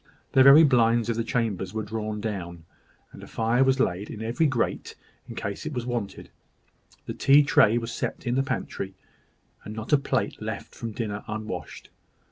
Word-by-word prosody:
The 135 - +5
very 140 +4 +9
blinds 120 -4 +3
of 115 - 0
the 115 - -1
chambers 110 -5 -2
were 110 - -2
drawn 110 0 -4
down, 85 -6 -5 0.5
and - - -12
a - - -10
fire 115 +3 +1
was 135 0 +2
laid 100 -2 -1
in 110 -1 -7
every 120 +8 +1
grate, 130 -4 -2 0.3
in - - -7
case 100 -1 -5
of 155 - -5
its 120 - -3
being 120 - -3
wanted. 110 -5 -5 0.7
The - - -5
tea 140 +2 +5
tray 120 -5 +4
was 115 0 -3
set - - -4
in 120 - 0
the 135 - +2
pantry, 95 -7 -4 0.7
and 105 - -8
not 110 +6 -4
a 145 - +6
plate 140 - -2
left - - -6
from 115 - -6
dinner 105 -2 -4
unwashed. 110 0 -6
115 Hz, 190 wpm, -26 LUFS, 105-125 Hz, 0.7 s, very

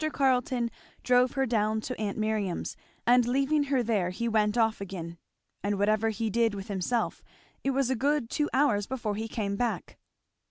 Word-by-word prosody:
Carleton 250 -3 +1 0.3
drove 250 0 +4
her 270 -1 +1
down 220 -2 +1
to 250 +3 -4
aunt 205 -2 -2
Miriam's, 215 -4 -1 0.3
and 245 0 +5
leaving 275 +4 +2
her 270 -3 +1
there 210 -6 +1
he 235 +6 -3
went 215 -1 +2
off 220 -3 +2
again; 170 -4 -6 0.4
and 200 0 -1
whatever 215 +2 +2
he 220 +1 -2
did 225 0 +1
with 200 +2 -7
himself 200 +5 -1 0.4
it 275 - +1
was 270 -1 +1
a - - +2
good 280 +1 +1
two 295 +5 -1
hours 240 -8 +2
before 235 -5 -2
he 220 +2 -3
came 205 -3 -2
back. 240 +2 -2
225 Hz, 175 wpm, -28 LUFS, 205-255 Hz, 0.4 s, and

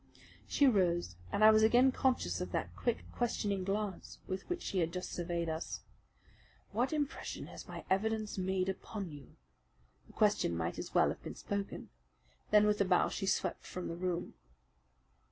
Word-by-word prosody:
She 285 - +3
rose, 175 - +2 0.2
and 215 - +2
I 215 - +10
was 215 0 +5
again 245 +4 +6
conscious 260 -1 +1
of - - -4
that - - -2
quick, 240 -2 -1
questioning 205 -5 -1
glance 200 0 -3
with 190 - -5
which 355 0 -2
she 190 - -1
had 165 -1 +1
just 180 +1 -4
surveyed 170 -1 -2
us. 160 +1 -3 0.9
"What 245 +4 +1
impression 295 -3 -3
has - - -10
my - - -7
evidence 215 +2 0
made 190 0 0
upon 190 -1 -4
you?" 145 -3 -12 0.7
The - - -17
question 85 - +2
might 85 +1 -2
as - - -7
well - - +5
have - - -5
been - - -7
spoken. 200 0 -4 0.6
Then, 210 0 +6
with 210 -1 +2
a - - +4
bow, 185 -1 +3
she 195 - -3
swept - - 0
from 180 - -5
the 170 - -3
room. 175 0 -2
195 Hz, 170 wpm, -34 LUFS, 180-220 Hz, 0.9 s, I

